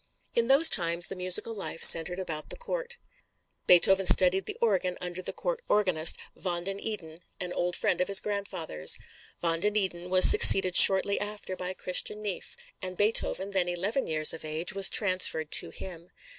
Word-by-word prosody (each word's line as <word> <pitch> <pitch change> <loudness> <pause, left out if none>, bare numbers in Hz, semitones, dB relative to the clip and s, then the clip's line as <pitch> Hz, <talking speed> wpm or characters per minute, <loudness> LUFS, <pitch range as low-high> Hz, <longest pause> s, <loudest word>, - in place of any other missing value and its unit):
In 235 -1 -2
those 275 +5 +5
times 170 -1 +1
the - - -9
musical 185 +5 -2
life 195 -5 -5
centered 165 +2 +5
about 160 -5 -8
the - - -8
Court. 485 0 -7 0.7
Beethoven 190 +2 +2
studied 185 +1 +2
the - - -8
organ 190 -5 -3
under 180 0 -8
the - - -5
court - - -7
organist, 180 -6 +1 0.2
Van 175 -2 -7
den 195 +2 -7
Eeden, 165 -8 -9 0.2
an 180 -2 -8
old 175 0 -5
friend 180 - -3
of 180 - -3
his 200 -1 +1
grandfather's. 175 - -4 0.4
Van 165 -1 -3
den 210 +4 -3
Eeden 180 -4 -5
was 185 0 +6
succeeded 185 -2 +7
shortly 195 +1 +7
after 205 -2 -8
by 185 0 -8
Christian 185 +4 -2
Neefe, 200 -4 -8 0.2
and 185 -1 -8
Beethoven, 205 -2 -1
then 185 -2 -3
eleven 195 +9 -5
years 155 -1 +1
of 165 - -11
age, 155 +5 -5
was 195 0 0
transferred 185 -6 -1
to - - +1
him. 175 -2 -13
185 Hz, 175 wpm, -25 LUFS, 175-200 Hz, 0.7 s, succeeded